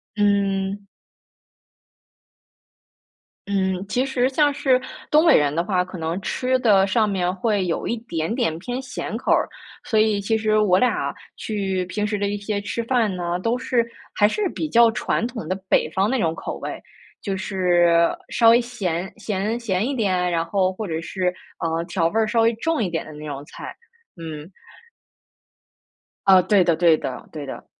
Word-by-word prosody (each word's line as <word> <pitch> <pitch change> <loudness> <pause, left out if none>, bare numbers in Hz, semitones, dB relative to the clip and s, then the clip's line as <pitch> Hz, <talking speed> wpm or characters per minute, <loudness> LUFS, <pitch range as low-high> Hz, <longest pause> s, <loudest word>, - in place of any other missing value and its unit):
嗯。 200 -1 0 2.6
嗯， 190 -2 0
其 250 +5 0
实 260 -1 +1
像 290 +1 +2
是 275 -3 +2 0.3
东 305 +2 +4
北 320 - +7
人 145 0 +2
的 170 - +1
话， 180 -1 +1
可 185 0 -9
能 165 +2 -2
吃 255 +5 0
的 205 -6 +4
上 210 +2 +2
面 180 -2 0
会 205 -1 0
有 170 - -2
一 235 - -1
点 170 -5 -3
点 230 -11 0
偏 245 +7 -4
咸 250 -4 -5
口 - - -1
儿， - - +3 0.3
所 220 - +1
以 215 -2 +2
其 220 +3 +1
实 215 -1 +2
我 195 -4 +4
俩 195 - +1 0.2
去 195 -4 -2
平 210 +4 -2
时 210 0 -1
的 200 - 0
一 205 +1 -2
些 205 0 -3
吃 220 +3 -3
饭 230 -4 +1
呢， 175 0 -2
都 230 +6 0
是 250 -2 +1 0.3
还 205 - +4
是 405 - -1
比 315 - -4
较 235 -2 +5
传 225 - -1
统 230 -9 -6
的 185 - -1
北 155 - +2
方 190 +5 +1
那 260 +1 0
种 165 -5 0
口 - - -5
味 - - -6 0.4
就 195 -2 -2
是 175 -3 +2
稍 230 -1 +5
微 235 +1 +5
咸 190 -7 -3
咸 210 +2 -2
咸 210 -2 -1
一 280 - -2
点， 185 -6 +1
然 165 -1 0
后 185 +1 +1
或 210 +2 -5
者 160 -1 -3
是， 180 +1 -2 0.3
呃， 165 0 -1
调 170 -2 0
味 215 +7 0
儿 220 - +2
稍 230 +2 +2
微 230 +1 +3
重 320 +3 0
一 - - 0
点 165 -1 -2
的 155 - -10
那 150 +1 -9
种 140 -2 -6
菜。 - - -9 0.4
嗯。 160 0 -8 1.8
呃， 190 -1 +7
对 200 -2 +4
的 170 -1 +2
对 165 -1 +4
的， 130 -4 -6
对 150 -2 -6
的。 135 - -8
200 Hz, 195 characters per minute, -22 LUFS, 175-230 Hz, 2.6 s, 北